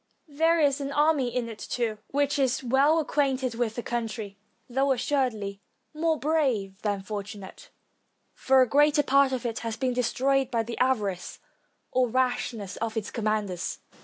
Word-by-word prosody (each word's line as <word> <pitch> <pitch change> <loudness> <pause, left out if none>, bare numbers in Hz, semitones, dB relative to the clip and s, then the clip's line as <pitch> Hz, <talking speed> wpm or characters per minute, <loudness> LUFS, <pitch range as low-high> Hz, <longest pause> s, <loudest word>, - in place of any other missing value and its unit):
There 325 +3 +2
is 285 -2 +2
an 275 0 -3
army 295 -2 +3
in 240 -1 -2
it, 225 -2 -8
too, 225 -3 -2
which 285 +1 0
is 265 -1 +1
well 270 +6 +3
acquainted 270 -5 0
with 230 -1 -2
the 240 - -4
country, 220 -4 -4 0.3
though, 270 +2 +1
assuredly, 230 -7 -1 0.3
more 320 +1 +1
brave 255 -12 0
than 205 -2 -1
fortu 205 +1 -5
nate, 205 - -12 0.6
for 265 -1 +4
a - - -1
great 295 +3 +4
part 275 0 +4
of 255 -2 -3
it 230 -1 -2
has 230 0 -4
been 255 +1 0
destroyed 260 +2 +1
by 230 -3 0
the 230 +1 -6
avarice 210 -8 0 0.5
or 255 -1 +2
rashness 245 -5 -1
of 225 0 -3
its 215 - -3
commanders. 210 -5 -2
250 Hz, 160 wpm, -27 LUFS, 220-275 Hz, 0.6 s, for